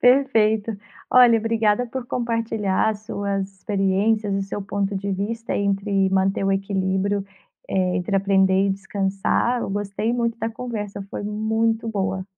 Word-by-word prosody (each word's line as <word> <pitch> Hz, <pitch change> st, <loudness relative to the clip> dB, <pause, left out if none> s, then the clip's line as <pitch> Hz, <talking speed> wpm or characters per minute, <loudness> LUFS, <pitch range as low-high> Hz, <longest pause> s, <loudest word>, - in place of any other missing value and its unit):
Perfeito. 225 Hz, -5 st, +3 dB, 0.3 s
Olha, 245 Hz, -2 st, +7 dB
obrigada 225 Hz, +1 st, +1 dB
por 245 Hz, +1 st, -6 dB
compartilhar 225 Hz, -5 st, 0 dB
as 210 Hz, -1 st, -6 dB
suas 200 Hz, -2 st, -3 dB
experiências 200 Hz, +1 st, +1 dB
e 195 Hz, -, 0 dB
seu 195 Hz, +1 st, -5 dB
ponto 200 Hz, 0 st, -2 dB
de 200 Hz, +1 st, -3 dB
vista 225 Hz, +4 st, -3 dB
entre 200 Hz, -1 st, +1 dB
manter 195 Hz, +1 st, +1 dB
o 195 Hz, -, +2 dB
equilíbrio, 195 Hz, 0 st, 0 dB, 0.4 s
eh, 185 Hz, -1 st, +1 dB
entre 180 Hz, +3 st, -2 dB
aprender 195 Hz, 0 st, +3 dB
e -, -, +2 dB
descansar. 195 Hz, +4 st, 0 dB
Eu -, -, -3 dB
gostei 205 Hz, +3 st, -2 dB
muito 235 Hz, -1 st, -1 dB
da 225 Hz, -, -1 dB
conversa, 215 Hz, -4 st, -5 dB
foi -, -, -5 dB
muito 220 Hz, +2 st, 0 dB
boa. 190 Hz, -3 st, -2 dB
205 Hz, 145 wpm, -23 LUFS, 195-225 Hz, 0.4 s, Olha